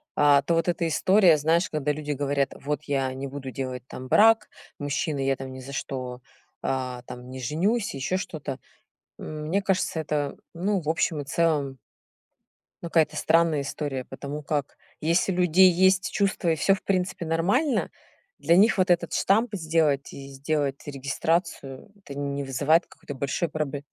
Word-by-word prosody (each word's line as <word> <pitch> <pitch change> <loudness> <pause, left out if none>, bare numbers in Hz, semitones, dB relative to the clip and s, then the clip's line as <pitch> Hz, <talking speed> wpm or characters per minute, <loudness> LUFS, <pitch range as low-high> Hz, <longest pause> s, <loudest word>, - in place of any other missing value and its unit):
а, 145 -1 +5
то 165 +5 0
вот 165 +1 +1
эта 170 -1 0
история, 180 +1 +4
знаешь, 165 +4 +2
когда 150 -1 -1
люди 150 0 -4
говорят: 140 -1 0
"Вот 145 0 -3
я 135 -2 -1
не 135 +1 -5
буду 135 -1 -7
делать 130 0 -5
там 130 0 -8
брак". 225 - +5 0.3
Мужчина: 145 +1 -2
"Я 135 0 +1
там 130 0 -7
ни 130 - -8
за 135 +2 -9
что, 130 -2 -5 0.4
а, 125 -2 -2
там 125 0 -10
не 130 - -7
женюсь", 190 - 0
ещё 140 +7 -1
что-то. 145 -7 -5 0.6
М, 155 0 -6
мне 195 +5 0
кажется, 190 -4 0
это, 150 -2 -2 0.2
ну, 190 +3 0
в 150 - -7
общем 160 -1 0
и - - -5
целом 145 -3 0 1.0
ну, 170 - -5
какая-то 165 -2 +2
странная 165 -2 +3
история, 140 -2 -4
потому 145 +1 -6
как 145 -1 -3 0.2
если 170 +4 +2
у - - -2
людей 180 +1 +6
есть 190 +2 +3
чувства 195 -4 0
и 160 - +3
всё 175 +6 +3
в 190 - -5
принципе 180 -2 -1
нормально, 200 - +1 0.5
для 170 - +3
них 215 +3 +5
вот 185 - +2
этот 175 -1 +2
штамп 220 +5 +2
сделать 160 -5 +1
и 135 0 -9
сделать 140 0 -2
регистрацию- 140 +1 -2
это 140 - -9
не 140 0 -2
вызывает 145 +5 +2
какой-то 145 - -10
большой 140 +5 -2
пробл 150 -2 -3
150 Hz, 170 wpm, -26 LUFS, 140-170 Hz, 1.0 s, людей